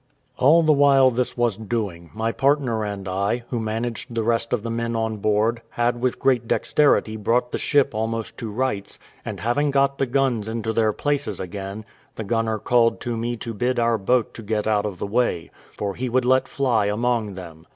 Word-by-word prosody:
All 160 +6 +6
the 155 -1 +5
while 140 -2 +5
this 125 +1 -2
was 120 -4 +1
doing, 100 -7 -4
my 110 +1 -1
partner 135 -4 +1
and 100 -2 -5
I, 100 +6 -1
who 120 - -1
managed 115 +2 -4
the 115 - 0
rest 115 0 0
of 120 -4 0
the 115 - -3
men 115 0 -2
on 110 -1 -1
board, 110 +3 +1
had 120 0 -1
with 125 -1 0
great 125 -4 +1
dexterity 140 -7 +2
brought 120 +3 0
the - - -2
ship 145 -4 +2
almost 110 +1 -3
to 115 -4 -4
rights, 105 -3 -2 0.3
and - - -6
having 145 +6 +1
got 140 0 +1
the 135 - +1
guns 125 -4 0
into 110 0 -2
their 110 -1 +2
places 140 -6 -2
again, 100 +3 -6 0.3
the 110 - -4
gunner 110 +1 0
called 115 +2 +2
to 120 -1 -3
me 120 +1 -2
to 115 +1 -5
bid 125 +4 -1
our 115 -1 +2
boat 120 +4 +1
get 105 -1 0
out 105 -1 +1
of 100 -3 -6
the - - -4
way, 100 -5 0 0.3
for 100 -1 -2
he 125 +5 -3
would 125 +1 +1
let 130 +1 +3
fly 120 -7 +1
among 110 -1 0
them. 85 -3 -10
115 Hz, 200 wpm, -23 LUFS, 105-125 Hz, 0.3 s, All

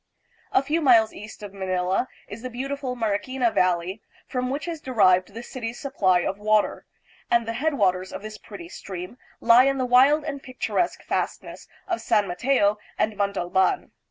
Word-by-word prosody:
A 260 - +3
few 310 +4 0
miles 230 -6 +5
east 210 0 -10
of 200 -1 -8
Manila 190 +3 -1 0.2
is 205 +3 -9
the 255 - -5
beautiful 265 +1 -4
Mariquina 230 +2 0
Valley, 180 +3 +1 0.2
from 250 -1 -2
which 285 +5 -3
is 330 -3 -5
derived 185 -6 +3
the 230 - -6
city's 240 -2 -6
supply 190 -10 +2
of 195 +3 -3
water, 215 0 +1 0.4
and 235 -1 +2
the 230 - -2
headwaters 205 -10 0
of - - -7
this 215 0 -8
pretty 195 -5 -10
stream 185 +6 -8 0.2
lie 235 +2 +7
in 275 0 +2
the 255 - 0
wild 270 +5 +5
and 285 -2 -5
pictur 250 -5 -3
esque 345 - -1
fastness - - -4 0.2
of 350 -2 -2
San 205 -1 +2
Mateo 205 +2 +1 0.2
and 215 -1 0
Montalban. 195 - 0
225 Hz, 170 wpm, -24 LUFS, 195-260 Hz, 0.4 s, lie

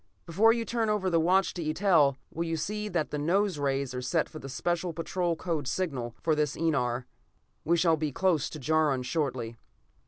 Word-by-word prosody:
Before 200 +7 +4
you 230 0 -1
turn 230 -2 0
over 195 -3 0
the 165 - +3
watch 180 +3 +3
to 175 - -4
Eitel, 155 -3 +3 0.2
will 165 - -2
you 165 -1 -2
see 210 +6 -3
that 170 -5 -1
the 150 - -2
nose 185 +3 +1
rays 135 -2 -1
are 125 - -3
set 160 +6 0
for 155 - -10
the 135 - -8
Special 175 +5 -2
Patrol 170 +1 -1
code 160 -5 -3
signal 135 -9 -2
for 160 - +3
this 150 -2 0
enar. 130 -6 0 0.6
We 170 +2 +2
shall 165 -1 +3
be 150 -1 -2
close 165 -2 +1
to 155 - -8
Jaron 150 -2 +1
shortly." 125 -5 -2
160 Hz, 195 wpm, -29 LUFS, 140-180 Hz, 0.6 s, Before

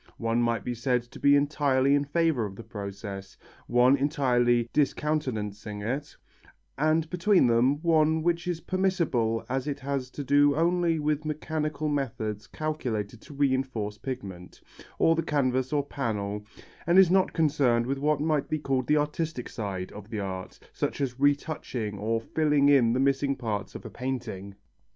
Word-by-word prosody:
One 115 0 0
might 115 -3 0
be 125 - -2
said 125 +1 0
to 120 - -14
be 140 0 +5
entirely 140 -2 +2
in 145 0 +2
favour 160 -4 +1
of 95 - -10
the 115 - -9
process, 100 -2 -7 0.3
one 125 +3 +5
entirely 125 -4 +2
discountenancing 110 -9 -1
it, 135 +7 -4 0.6
and 155 +3 +1
between 180 0 +3
them 125 +4 +3
one 160 -1 +3
which 170 +1 0
is 170 -2 -2
permissible 165 -13 0
as 130 +2 -2
it 145 -1 -3
has 135 -2 -3
to 145 - -6
do 145 +1 +4
only 170 +1 +2
with 150 0 -1
mechanical 155 0 -3
methods 115 -7 -3
calculated 120 -9 -3
to 145 - -12
reinforce 130 -7 -1
pigment, 95 -10 -7 0.4
or 165 - +4
the 165 - +1
canvas 130 -4 0
or 145 -2 +1
panel, 105 -7 -3 0.4
and 170 +2 +4
is 190 -2 +7
not 190 0 +3
concerned 140 -7 +2
with 135 +2 -2
what 150 +1 +1
might 150 -1 0
be 155 - 0
called 135 -4 -1
the 150 - +4
artistic 150 -2 -2
side 95 -4 -5
of 105 +1 -11
the 110 - -4
art, 95 -2 -5 0.2
such - - -2
as 135 -2 -2
retouching 140 -7 -1
or 115 +2 0
filling 145 +3 +2
in 130 -5 +5
the 125 - 0
missing 140 +1 +2
parts 105 -5 -4
of - - -8
a - - -6
painting. 120 -7 -5
135 Hz, 165 wpm, -27 LUFS, 115-150 Hz, 0.6 s, is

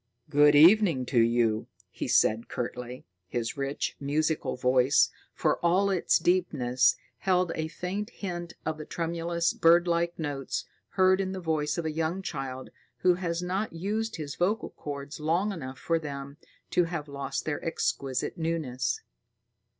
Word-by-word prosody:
"Good 145 0 +6
evening 165 -3 +6
to 120 - +5
you," 115 -1 +2 0.2
he - - -4
said 110 +2 +3
curtly. 125 +1 -5 0.2
His 115 +6 -3
rich, 140 0 -2
musical 155 +3 0
voice, 125 +2 +3 0.2
for - - 0
all 190 +4 +3
its 185 -3 +3
deepness, 130 -9 +2 0.2
held 180 -2 +2
a 160 0 -2
faint 185 +6 -4
hint 175 -5 -6
of 155 -1 -2
the 155 - -6
tremulous, 170 0 -1
birdlike 170 0 +3
notes 145 -4 -3 0.3
heard 190 0 +4
in 190 0 -2
the 190 - -4
voice 155 -3 -1
of 170 - -2
a 160 - 0
young 165 +4 -2
child 130 -5 -5 0.3
who 180 -1 +5
has 175 -1 -2
not 190 +4 -2
used 215 +6 -2
his 150 -4 -5
vocal 205 +5 0
chords 145 +1 -7
long 170 +7 +1
enough 130 -8 -6
for 165 +2 0
them 140 -2 -7 0.3
to 175 - +3
have 165 -3 -4
lost 140 -1 -4
their 150 -2 -3
exquisite 135 -4 -2
newness. 130 -7 -1
160 Hz, 150 wpm, -28 LUFS, 135-175 Hz, 0.3 s, Good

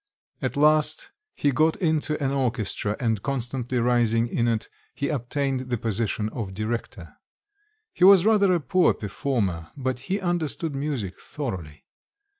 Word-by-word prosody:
At - - -2
last 150 +1 +3 0.2
he 145 - +1
got 155 +4 +3
into 155 -4 0
an 135 - +1
orchestra 115 -5 -1
and 115 -5 0
constantly 125 -1 -3
rising 120 -1 +2
in 120 0 0
it, 115 -2 0 0.3
he 140 - -2
obtained 135 -1 -2
the 120 - 0
position 110 -1 -1
of 105 -5 -5
director. 110 +3 -4 0.8
He - - -1
was 190 -1 +8
rather 210 -3 +4
a 175 - +3
poor 170 +5 +3
performer; 100 -6 -2
but 130 -2 -2
he 195 +2 +1
understood 170 -3 -1
music 135 -9 -3
thoroughly. 90 - -6
130 Hz, 140 wpm, -25 LUFS, 115-150 Hz, 0.8 s, was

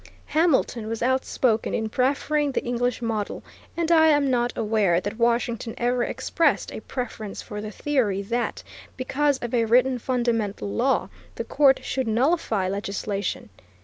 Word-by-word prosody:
Hamilton 280 -8 +1
was 225 +1 -3
outspoken 255 -3 +1
in 220 - -1
preferring 280 +4 0
the - - -1
English 245 0 -1
model, 220 -3 -3 0.3
and 340 0 0
I 320 -1 +6
am 290 -3 +3
not 240 -1 +1
aware 210 -6 +2
that 205 +4 -5
Washington 235 -1 0
ever 245 0 +1
expressed 325 +2 0
a - - -5
preference 220 -4 -6
for 210 -2 -6
the 215 - -5
theory 215 -6 0
that, 235 +4 -2 0.3
because 280 +2 +1
of 240 - -4
a 230 -2 +3
written 250 +3 +3
fundamental 230 -5 -1
law, 260 +5 +1 0.3
the - - -3
court 275 -2 +3
should 260 -2 -2
nullify 230 - +1
legislation. 200 - -3
240 Hz, 145 wpm, -24 LUFS, 220-265 Hz, 0.3 s, I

